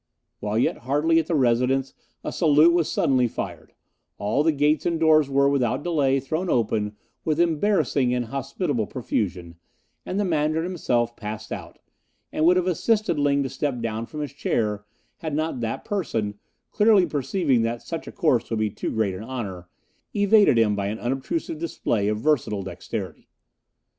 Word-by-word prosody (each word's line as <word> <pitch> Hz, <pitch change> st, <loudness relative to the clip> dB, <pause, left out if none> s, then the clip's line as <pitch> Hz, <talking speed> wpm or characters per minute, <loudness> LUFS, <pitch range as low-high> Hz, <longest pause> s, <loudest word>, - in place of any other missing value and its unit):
While 105 Hz, +1 st, -2 dB
yet 120 Hz, -, +1 dB
hardly 160 Hz, +4 st, +3 dB
at 160 Hz, -, -2 dB
the 170 Hz, -, 0 dB
residence 130 Hz, +1 st, +2 dB, 0.3 s
a -, -, -3 dB
salute 160 Hz, 0 st, +5 dB
was 170 Hz, -3 st, +1 dB
suddenly 130 Hz, -2 st, +2 dB
fired; -, -, -7 dB, 0.4 s
all 105 Hz, +7 st, 0 dB
the 160 Hz, +2 st, +3 dB
gates 150 Hz, +1 st, +2 dB
and 170 Hz, -2 st, 0 dB
doors 155 Hz, -3 st, +4 dB
were, 140 Hz, 0 st, +3 dB
without 140 Hz, -1 st, +1 dB
delay, 140 Hz, -6 st, +2 dB
thrown 160 Hz, +7 st, -3 dB
open 105 Hz, -4 st, 0 dB, 0.3 s
with 155 Hz, 0 st, 0 dB
embarrassing 165 Hz, -6 st, +2 dB
and 125 Hz, -1 st, 0 dB
hospitable 135 Hz, -, -2 dB
profusion, 90 Hz, -9 st, -3 dB, 0.4 s
and 190 Hz, -, -3 dB
the 205 Hz, -, +1 dB
Mandarin 155 Hz, -1 st, +1 dB
himself 120 Hz, -10 st, 0 dB
passed 105 Hz, 0 st, -7 dB
out, -, -, -7 dB, 0.5 s
and 155 Hz, -, +1 dB
would 180 Hz, +2 st, +5 dB
have 180 Hz, -, +1 dB
assisted 205 Hz, 0 st, +1 dB
Ling 140 Hz, -1 st, +2 dB
to 135 Hz, -, -3 dB
step 135 Hz, -1 st, -2 dB
down 115 Hz, 0 st, -3 dB
from 150 Hz, -, -6 dB
his 145 Hz, -2 st, -5 dB
chair 105 Hz, -7 st, -1 dB, 0.3 s
had 160 Hz, -6 st, -4 dB
not 155 Hz, -3 st, -1 dB
that 115 Hz, -1 st, -3 dB
person, 110 Hz, -, -2 dB, 0.3 s
clearly 210 Hz, -3 st, +5 dB
perceiving 140 Hz, -3 st, 0 dB
that 115 Hz, +1 st, -2 dB
such 165 Hz, -1 st, -6 dB
a -, -, -6 dB
course 135 Hz, -, +1 dB
would 115 Hz, -, -1 dB
be 110 Hz, -1 st, 0 dB
too -, -, -4 dB
great 110 Hz, -4 st, 0 dB
an 95 Hz, -, -7 dB
honour, 100 Hz, -8 st, -6 dB, 0.5 s
evaded 205 Hz, -, +5 dB
him 110 Hz, -2 st, +3 dB
by 100 Hz, -1 st, -2 dB
an 105 Hz, +2 st, -3 dB
unobtrusive 135 Hz, -, -3 dB
display 115 Hz, -10 st, -1 dB
of 105 Hz, 0 st, 0 dB
versatile 110 Hz, -6 st, 0 dB
dexterity. 95 Hz, -, -6 dB
135 Hz, 170 wpm, -24 LUFS, 115-160 Hz, 0.5 s, salute